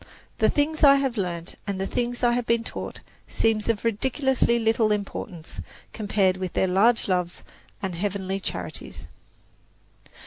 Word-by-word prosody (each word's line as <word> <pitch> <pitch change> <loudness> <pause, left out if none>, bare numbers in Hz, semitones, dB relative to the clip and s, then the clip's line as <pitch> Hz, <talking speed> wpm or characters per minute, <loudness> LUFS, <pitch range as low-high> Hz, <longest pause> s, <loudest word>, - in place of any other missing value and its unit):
The - - +4
things 310 +2 0
I 280 -1 +9
have 270 -3 0
learned 175 -4 -3
and 200 -2 -2
the 190 - -1
things 245 +3 -2
I 240 - +5
have 240 -1 -1
been 230 0 +2
taught - - -6 0.3
seem 225 -1 +1
of 220 -3 0
ridiculously 255 +2 +2
little 225 -1 +2
importance 195 -5 -4 0.3
compared 200 -3 +1
with 185 -2 -4
their - - +2
"large 205 +6 +3
loves 180 -2 -1 0.4
and 190 -2 -2
heavenly 195 +1 -2
charities." 85 - -6
210 Hz, 145 wpm, -25 LUFS, 185-240 Hz, 0.4 s, I